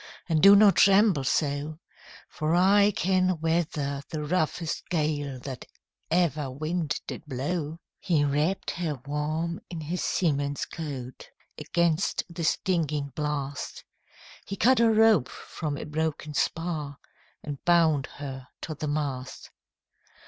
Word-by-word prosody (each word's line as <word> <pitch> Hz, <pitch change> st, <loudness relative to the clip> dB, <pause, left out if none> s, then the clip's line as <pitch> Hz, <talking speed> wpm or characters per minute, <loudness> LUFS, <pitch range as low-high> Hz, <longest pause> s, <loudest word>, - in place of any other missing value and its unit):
And 160 Hz, -3 st, +2 dB
do 200 Hz, +3 st, +9 dB
not 200 Hz, -1 st, +6 dB
tremble 195 Hz, -6 st, +5 dB
so; 145 Hz, +2 st, -1 dB, 0.5 s
For 155 Hz, +2 st, -1 dB
I 200 Hz, +3 st, +5 dB
can 185 Hz, -1 st, +1 dB
weather 155 Hz, -4 st, -1 dB
the 155 Hz, -2 st, -4 dB
roughest 160 Hz, 0 st, -1 dB
gale 150 Hz, -5 st, -1 dB
That 130 Hz, 0 st, -7 dB, 0.4 s
ever 155 Hz, -5 st, +1 dB
wind 155 Hz, +3 st, -2 dB
did -, -, -7 dB
blow.' 150 Hz, +4 st, -3 dB, 0.2 s
He 160 Hz, -6 st, +1 dB
wrapp'd 150 Hz, +7 st, 0 dB
her 160 Hz, -6 st, -3 dB
warm 155 Hz, +4 st, -2 dB
in 170 Hz, -3 st, -6 dB
his 170 Hz, +4 st, -3 dB
seaman's 145 Hz, -4 st, 0 dB
coat 135 Hz, -6 st, -7 dB, 0.3 s
Against 170 Hz, 0 st, +1 dB
the 170 Hz, 0 st, -5 dB
stinging 155 Hz, -5 st, 0 dB
blast; 145 Hz, -2 st, -3 dB, 0.6 s
He 200 Hz, -, -4 dB
cut 245 Hz, +5 st, +4 dB
a 230 Hz, -1 st, +5 dB
rope 220 Hz, -, +4 dB
from 150 Hz, -3 st, -5 dB
a -, -, -5 dB
broken 150 Hz, -1 st, -3 dB
spar, 155 Hz, -2 st, -2 dB, 0.5 s
And 145 Hz, -2 st, -6 dB
bound 165 Hz, -5 st, +3 dB
her 135 Hz, -3 st, -7 dB
to 160 Hz, -, -4 dB
the 150 Hz, 0 st, -5 dB
mast. 140 Hz, -3 st, -4 dB
155 Hz, 125 wpm, -27 LUFS, 145-175 Hz, 0.6 s, do